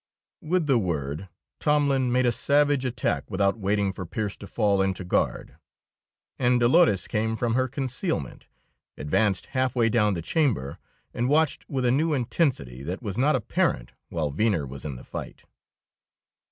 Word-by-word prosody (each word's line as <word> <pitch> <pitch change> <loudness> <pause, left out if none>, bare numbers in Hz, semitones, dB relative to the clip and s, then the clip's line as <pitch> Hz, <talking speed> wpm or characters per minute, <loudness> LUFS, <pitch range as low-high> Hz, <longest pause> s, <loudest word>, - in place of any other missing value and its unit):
With 175 +1 0
the 135 -5 +3
word 80 -1 -3 0.3
Tomlin 140 -4 +2
made 130 +1 +2
a 120 - +4
savage 140 +2 +2
attack 120 -2 -1
without 100 +2 +1
waiting 100 0 +1
for 95 - -6
Pearse 100 +4 -3
to 100 - -10
fall 100 -3 +1
into 95 -1 -1
guard. 90 - -1 0.8
And 125 -1 +3
Dolores 120 - +4
came 110 +1 -1
from 115 0 -1
her 130 +2 +2
concealment, 130 - -4 0.5
advanced 95 +7 0
half 130 -1 0
way 115 -2 +3
down 105 -4 +2
the 85 - -4
chamber, 110 - 0 0.3
and 120 +2 -1
watched 155 0 +1
with 130 -2 -1
a 120 - +4
new 155 +4 +2
intensity 120 - -1
that 90 - -5
was 100 -4 -4
not 145 +3 +3
apparent 65 - 0 0.2
while 80 -4 -2
Venner 90 -1 +1
was 70 +2 -9
in 70 -3 -4
the - - -10
fight. - - -8
115 Hz, 160 wpm, -26 LUFS, 95-130 Hz, 0.8 s, a